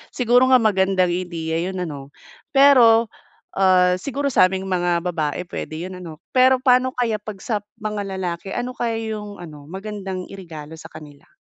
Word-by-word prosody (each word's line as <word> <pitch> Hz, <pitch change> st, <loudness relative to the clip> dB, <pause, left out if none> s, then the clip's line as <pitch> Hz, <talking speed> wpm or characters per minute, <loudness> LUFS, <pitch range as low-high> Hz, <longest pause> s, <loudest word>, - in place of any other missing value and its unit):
siguro 245 Hz, +1 st, +4 dB
nga 255 Hz, -, +8 dB
magandang 190 Hz, -4 st, +2 dB
ideya 170 Hz, -2 st, -3 dB
yun 190 Hz, -, -7 dB
ano. 140 Hz, -5 st, -7 dB, 0.5 s
Pero, 240 Hz, -5 st, +6 dB, 0.5 s
ah, 185 Hz, -1 st, +4 dB
siguro 280 Hz, +6 st, -3 dB
sa 185 Hz, -, +5 dB
aming 190 Hz, 0 st, -4 dB
mga 175 Hz, -2 st, 0 dB
babae 160 Hz, -3 st, -2 dB
puwede 155 Hz, -, -6 dB
yun 185 Hz, -, -8 dB
ano. 165 Hz, -4 st, -9 dB, 0.2 s
Pero 260 Hz, 0 st, +5 dB
paano 255 Hz, 0 st, +4 dB
kaya 230 Hz, -3 st, 0 dB
'pag 210 Hz, -2 st, -8 dB
sa 220 Hz, -4 st, -1 dB, 0.2 s
mga 210 Hz, -1 st, -4 dB, 0.2 s
lalake, 180 Hz, 0 st, -4 dB
ano 245 Hz, +1 st, -3 dB
kaya 230 Hz, -2 st, -2 dB, 0.2 s
yung 210 Hz, -1 st, -9 dB
ano, 150 Hz, -4 st, -11 dB
magandang 190 Hz, -1 st, -6 dB
iregalo 160 Hz, -5 st, -9 dB
sa 160 Hz, -, -11 dB
kanila? 145 Hz, -2 st, -13 dB
190 Hz, 165 wpm, -21 LUFS, 175-230 Hz, 0.5 s, nga